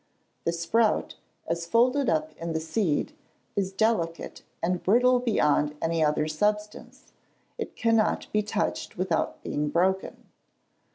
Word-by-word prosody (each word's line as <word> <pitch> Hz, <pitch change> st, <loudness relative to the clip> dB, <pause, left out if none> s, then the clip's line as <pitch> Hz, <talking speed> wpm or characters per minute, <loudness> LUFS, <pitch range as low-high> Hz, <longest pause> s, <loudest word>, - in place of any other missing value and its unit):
The 170 Hz, -, +2 dB
sprout, 190 Hz, +7 st, +1 dB, 0.3 s
as 170 Hz, +1 st, -3 dB
folded 250 Hz, +7 st, +3 dB
up 155 Hz, -1 st, -1 dB
in 165 Hz, 0 st, -4 dB
the 160 Hz, -, 0 dB
seed, 160 Hz, -, -1 dB, 0.4 s
is 190 Hz, -2 st, 0 dB
delicate 190 Hz, -5 st, -1 dB, 0.2 s
and 180 Hz, +1 st, 0 dB
brittle 250 Hz, +5 st, +4 dB
beyond 150 Hz, -, +1 dB
any 165 Hz, -1 st, +1 dB
other 150 Hz, 0 st, +1 dB
substance. 210 Hz, +6 st, -2 dB, 0.5 s
It -, -, -5 dB
cannot 225 Hz, -2 st, +2 dB
be 210 Hz, -, +3 dB
touched 210 Hz, -, -3 dB
without 180 Hz, -2 st, -1 dB
being 150 Hz, 0 st, -2 dB
broken. 190 Hz, +4 st, 0 dB
180 Hz, 125 wpm, -27 LUFS, 160-220 Hz, 0.5 s, brittle